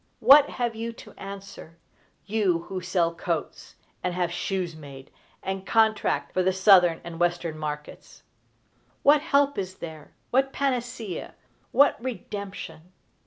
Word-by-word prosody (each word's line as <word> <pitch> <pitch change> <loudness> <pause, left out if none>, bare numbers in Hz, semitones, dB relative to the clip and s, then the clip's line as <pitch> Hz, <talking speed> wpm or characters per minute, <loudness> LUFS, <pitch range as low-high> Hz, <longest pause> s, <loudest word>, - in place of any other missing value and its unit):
What 285 +1 +7
have 240 -2 -2
you 230 +1 -5
to - - -13
answer, 195 -4 -10 0.5
you 195 -5 +1
who 185 +1 -5
sell 175 -2 0
coats, 170 -1 -4 0.3
and 180 -1 -1
have 175 -1 0
shoes 175 -1 -2
made, 140 -3 -12 0.3
and 190 0 -3
contract 220 0 +1
for 185 - +2
the 185 +1 +2
Southern 185 -3 +5
and 170 -1 -8
Western 175 -2 0
markets? 150 -1 -7 0.8
What 290 +1 +6
help 285 -4 +2
is 190 -1 -4
there, 160 -4 -10 0.2
what 270 +2 +2
panacea, 245 -8 -3 0.4
what 280 -4 +4
redemption? 195 -8 -7
190 Hz, 130 wpm, -26 LUFS, 170-225 Hz, 0.8 s, What